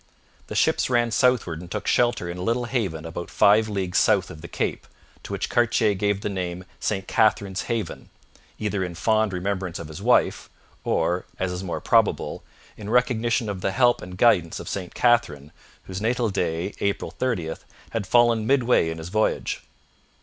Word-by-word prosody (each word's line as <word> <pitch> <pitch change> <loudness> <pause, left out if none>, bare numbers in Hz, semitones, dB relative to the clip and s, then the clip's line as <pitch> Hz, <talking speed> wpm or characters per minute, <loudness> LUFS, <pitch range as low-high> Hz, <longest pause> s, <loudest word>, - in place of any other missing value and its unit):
The - - -6
ships - - +2
ran 120 -2 +2
southward 110 -10 +2
and 90 - -10
took 105 +2 -4
shelter 120 -7 +2
in 85 +1 -5
a - - -4
little 115 +5 0
haven 100 -11 -2
about 85 +1 -6
five 110 +2 +4
leagues 95 -3 0
south - - +2
of 80 - -11
the 85 - -8
cape, - - -3 0.3
to - - -10
which - - -2
Cartier 115 -3 +2
gave 100 0 0
the - - -2
name 90 -2 -4
St 95 -2 -2
Catherine's 100 -3 +1
Haven, 115 -3 -3 0.5
either 105 -3 -1
in 90 -2 -5
fond 110 +2 +1
remembrance 95 -1 -3
of 80 - -8
his 80 - -8
wife, - - +2 0.3
or, 90 +1 0
as 95 -1 -1
is 90 +1 -4
more 90 - -4
probable, - - +1 0.3
in 105 -1 -7
recognition 120 -1 +1
of 100 -3 -4
the - - 0
help 120 +2 +3
and 90 0 -9
guidance 90 -7 +3
of - - -8
St 90 -3 -5
Catherine, 80 - +2 0.3
whose 95 +1 -6
natal 115 0 0
day, 85 +1 -2
April 100 0 -1
30, 95 -11 -2 0.4
had 110 -4 -3
fallen 120 -2 +3
midway 125 -10 +3
in 80 - -5
his 80 +1 -7
voyage. 110 +3 0
100 Hz, 180 wpm, -24 LUFS, 90-115 Hz, 0.5 s, five